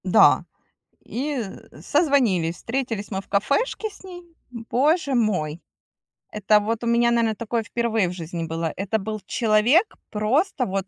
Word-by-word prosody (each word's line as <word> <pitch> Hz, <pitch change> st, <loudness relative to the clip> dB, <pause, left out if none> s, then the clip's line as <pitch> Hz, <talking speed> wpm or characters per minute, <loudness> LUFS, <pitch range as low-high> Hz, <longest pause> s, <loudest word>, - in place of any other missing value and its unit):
Да, -, -, +5 dB, 0.6 s
и 275 Hz, +2 st, -3 dB, 0.4 s
созвонились, 245 Hz, -, +2 dB
встретились 225 Hz, -4 st, -3 dB
мы 190 Hz, -1 st, -2 dB
в -, -, -25 dB
кафешке 280 Hz, -, 0 dB
с 405 Hz, -, -17 dB
ней. 360 Hz, -2 st, -10 dB, 0.3 s
Боже 275 Hz, +6 st, 0 dB
мой, 180 Hz, -9 st, 0 dB, 0.7 s
это 210 Hz, 0 st, +3 dB
вот 225 Hz, +2 st, -2 dB
у -, -, -2 dB
меня, 235 Hz, 0 st, +3 dB
наверно, 230 Hz, -2 st, +1 dB
такое 230 Hz, +1 st, -2 dB
впервые 225 Hz, -2 st, 0 dB
в 175 Hz, -, -4 dB
жизни 170 Hz, -1 st, -5 dB
было. 165 Hz, 0 st, -3 dB
Это 200 Hz, +3 st, -1 dB
был 215 Hz, +1 st, -4 dB
человек 235 Hz, -, +2 dB
просто 255 Hz, -, 0 dB
вот 195 Hz, -1 st, -3 dB
225 Hz, 145 wpm, -23 LUFS, 200-260 Hz, 0.7 s, Да